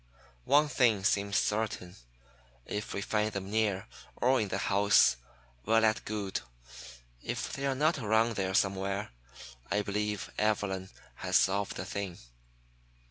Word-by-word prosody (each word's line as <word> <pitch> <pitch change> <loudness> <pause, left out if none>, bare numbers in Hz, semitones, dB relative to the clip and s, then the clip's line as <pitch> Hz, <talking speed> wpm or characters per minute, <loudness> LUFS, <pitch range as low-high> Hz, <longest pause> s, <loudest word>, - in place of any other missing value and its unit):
One 150 +2 +5
thing 115 -8 +2
seems 100 0 +2
certain, 105 -4 -1 0.7
if 105 +2 -4
we 100 - -2
find 105 +1 0
them 100 0 -5
near, 105 -3 +1 0.3
or 130 0 +3
in 105 - -1
the - - -2
house, 100 -10 +4 0.5
well 115 +1 +3
and 110 0 +1
good. 105 -3 -3 0.8
If - - -4
they 140 0 -2
are 135 - 0
not 155 +3 +2
around 110 0 +2
there 95 -1 -1
somewhere, 95 -1 0 0.6
I 105 +1 +1
believe 105 0 -2
Evelyn 100 -3 0 0.3
has - - -2
solved 100 +1 +2
the - - -5
thing. 100 -3 -4
105 Hz, 135 wpm, -31 LUFS, 100-110 Hz, 0.8 s, One